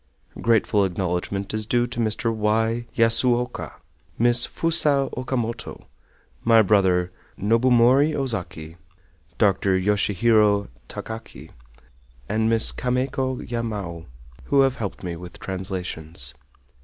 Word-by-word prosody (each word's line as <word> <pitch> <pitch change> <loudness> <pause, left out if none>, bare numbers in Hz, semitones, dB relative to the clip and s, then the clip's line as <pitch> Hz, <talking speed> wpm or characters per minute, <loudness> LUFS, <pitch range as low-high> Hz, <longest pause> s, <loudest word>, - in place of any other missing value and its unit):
Grateful 115 -2 +2
acknowledgment 95 +2 -3
is 110 -1 -2
due 120 0 +2
to 120 0 -6
Mr. 115 +1 0
Y. 110 +2 0
Yasuoka, 120 +2 +2 0.4
Miss 120 +1 +3
Fusa 150 -5 +2
Okamoto, 120 -2 -4 0.6
my 115 -1 +5
brother 95 -3 +2 0.3
Nobumori 125 +6 +3
Ozaki, 90 - -3 0.6
Dr. 95 -2 +2
Yoshihiro 105 +1 +2 0.2
Takaki, 110 0 -8 0.8
and 110 +1 0
Miss 115 -1 +4
Kameko 130 +1 -2
Yamao, 105 -8 -5 0.4
who 140 -1 +3
have 135 -1 +1
helped 100 -3 -5
me 85 -2 -4
with 90 +1 -10
translations. 90 -7 -4
110 Hz, 100 wpm, -23 LUFS, 95-120 Hz, 0.8 s, my